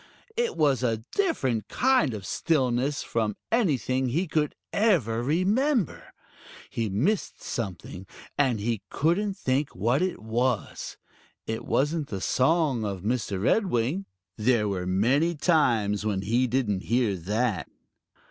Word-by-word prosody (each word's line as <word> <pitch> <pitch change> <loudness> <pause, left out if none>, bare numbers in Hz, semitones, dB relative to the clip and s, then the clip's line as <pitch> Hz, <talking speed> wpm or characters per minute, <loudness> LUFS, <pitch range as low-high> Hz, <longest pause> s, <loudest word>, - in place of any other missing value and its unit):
It 475 0 -1
was 140 -6 +3
a 115 -3 0
different 135 - 0
kind 250 - +2
of 100 -3 -7
stillness 135 -2 0
from 110 -3 -1 0.2
anything 130 - +1
he 160 +10 0
could 150 -2 0 0.2
ever 155 - +2
remember. 200 - +1 0.6
He 115 -2 -1
missed 155 - -1
something, 95 -3 -5 0.3
and 130 -6 +2
he 110 0 -1
couldn't 190 +6 +1
think 135 -3 -1
what 120 - +1
it 185 0 0
was. 115 +2 -2 0.5
It 110 +1 -4
wasn't 150 +2 0
the 100 - -4
song 135 - +2
of 100 -3 -4
Mr. 110 -3 -1
Redwing. 160 - +1 0.3
There 110 -1 +2
were 90 -3 -2
many 130 - +2
times 115 - +2
when 100 -3 -1
he 120 +5 +2
didn't 115 -6 0
hear 115 -4 +1
that. 105 +3 -1
125 Hz, 130 wpm, -27 LUFS, 110-160 Hz, 0.6 s, was